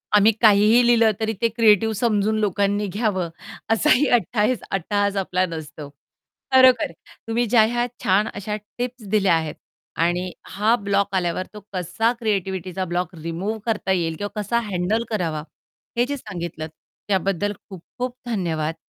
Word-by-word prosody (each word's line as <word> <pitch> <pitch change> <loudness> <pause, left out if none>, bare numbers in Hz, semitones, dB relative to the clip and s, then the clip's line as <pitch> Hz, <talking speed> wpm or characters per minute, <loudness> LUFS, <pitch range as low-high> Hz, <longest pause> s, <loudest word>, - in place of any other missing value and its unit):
आम्ही 210 +2 +6
काहीही 215 +3 +6
लिहिलं 230 -2 +5
तरी 220 0 -1
ते 230 - +4
क्रिएटिव्ह 220 -1 +4
समजून 215 -1 +1
लोकांनी 205 0 0
घ्यावं, 190 -3 -1 0.4
असाही 275 +4 +4
अ, - - +5
हट्टईस 230 +1 +1
हट्टहास 200 +2 0
आपला 185 -1 +1
नसतो. 155 -3 -8 0.6
खरोखर 260 -2 +6 0.4
तुम्ही 235 +2 +1
ज्या 225 0 +4
ह्या 240 +2 +1 0.2
छान 200 +1 +3
अशा 210 +1 -4 0.2
टिप्स 245 -2 -4
दिल्या 200 -4 +3
आहेत 160 -2 -2 0.5
आणि 175 +1 0 0.2
हा 215 +4 +2
ब्लॉक 200 -1 0
आल्यावर 180 0 -1
तो 210 - -8
कसा 185 +6 0
क्रिएटिव्हिटीचा 190 -4 -2
ब्लॉक 175 0 -3
रिमूव्ह 185 +7 -3
करता 210 -4 -1
येईल 165 -3 0
किंवा 205 +1 -5
कसा 235 +3 0
हँडल 190 +5 0
करावा, 165 -8 -2 0.5
हे 240 - +3
जे 285 +1 -3
सांगितलंत, 170 -7 -6 0.4
त्याबद्दल 195 +1 0 0.2
खूप 185 -4 -9 0.2
खूप 250 0 -2
धन्यवाद. 165 -8 -2
205 Hz, 145 wpm, -22 LUFS, 180-225 Hz, 0.6 s, आम्ही